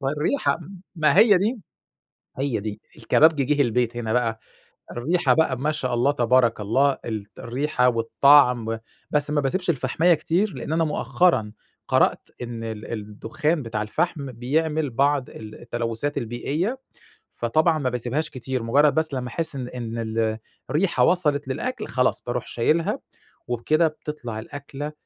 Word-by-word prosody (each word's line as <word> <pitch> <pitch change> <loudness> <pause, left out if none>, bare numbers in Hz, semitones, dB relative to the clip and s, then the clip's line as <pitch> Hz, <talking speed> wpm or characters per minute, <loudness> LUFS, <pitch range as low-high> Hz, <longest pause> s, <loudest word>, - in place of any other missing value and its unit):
ما 135 0 -1
الريحة 150 - 0 0.4
ما 155 +1 +3
هي 210 -4 +7
دي 220 +4 -1 0.8
هي 135 -5 -1
دي، 105 0 -6 0.2
الكبابجي 155 -3 +4
جِه 145 +2 +2
البيت 120 -1 0
هنا 115 -1 -2
بقى، 115 -2 0 0.5
الريحة 160 +9 +1
بقى 140 -6 +1
ما 150 +3 0
شاء 130 -5 -2
الله 130 +4 +2
تبارك 120 -3 +2
الله 135 +7 +2
الط 105 -2 -6
الريحة 125 +1 0
والطَعم، 120 -1 +4 0.3
بس 150 0 +1
ما 150 -1 +2
باسيبش 180 +6 0
الفحماية 160 +5 +2
كتير 170 +4 0
لأن 130 +4 -5
أنا 165 0 +2
مؤخرًا 130 -5 +1 0.4
قرأت - - +2
إن 115 -1 -6
ال 110 0 -6
الدخان 115 +9 -2
بتاع 110 -2 -3
الفحم 140 +3 -2
بيعمل 150 +4 -1
بعض 140 +2 +1
ال 110 -1 -10
التلوثات 120 +4 -3
البيئية 150 - -2 0.5
فطبعًا 155 +8 +1
ما 130 -4 -1
باسيبهاش 125 +6 -2
كتير، 130 -2 -4
مجرد 145 +6 +3
بس 155 -2 0
لمّا 125 -1 -3
أحس 160 +5 -2
إن 125 -2 -4
إن 115 -2 -6
ال 110 -1 -1 0.3
الريحة 170 +5 +2
وصلِت 150 -6 +2
للأكْل 250 - -3
خلاص 125 -1 0
باروْح 120 0 -3
شايلها، 155 +8 0 0.5
وبكده 155 +7 +2
بتطلع 150 -7 -7
الأكلة 145 +4 -7
135 Hz, 145 wpm, -24 LUFS, 115-155 Hz, 0.8 s, هي